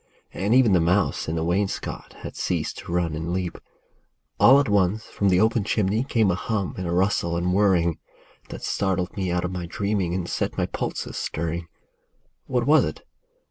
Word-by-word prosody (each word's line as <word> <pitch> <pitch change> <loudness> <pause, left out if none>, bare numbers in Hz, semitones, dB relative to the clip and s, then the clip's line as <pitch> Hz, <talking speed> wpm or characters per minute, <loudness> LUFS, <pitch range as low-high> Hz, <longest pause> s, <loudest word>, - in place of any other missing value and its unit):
And 100 +5 +1
even 125 -6 +5
the 90 - +5
mouse 90 +4 +1
in 80 - -2
the 80 - -1
wainscot 95 +4 -2
Had - - -7
ceased - - -2
to - - -8
run 85 -2 0
and 80 +2 -3
leap, 90 -1 -3 0.8
All 135 +3 +8
at 140 - +1
once 100 +1 +1
from 100 - 0
the 90 -1 +4
open 110 +1 +2
chimney 105 +2 +1
Came 115 -7 +2
a - - +1
hum 100 +1 -2
and 90 -1 -4
a - - -2
rustle 90 -2 +1
and 90 +1 0
whirring, 90 -5 +2 0.5
That - - -8
startled 95 -2 -1
me 95 -3 -2
out 90 0 0
of 90 - -3
my 90 -2 -4
dreaming, 100 -1 -1
And 90 -2 -2
set - - -2
my - - +1
pulses - - -4
stirring. 85 +1 -3 0.8
What 125 -2 0
was 155 +2 +5
it - - -5
95 Hz, 190 wpm, -24 LUFS, 85-105 Hz, 0.8 s, All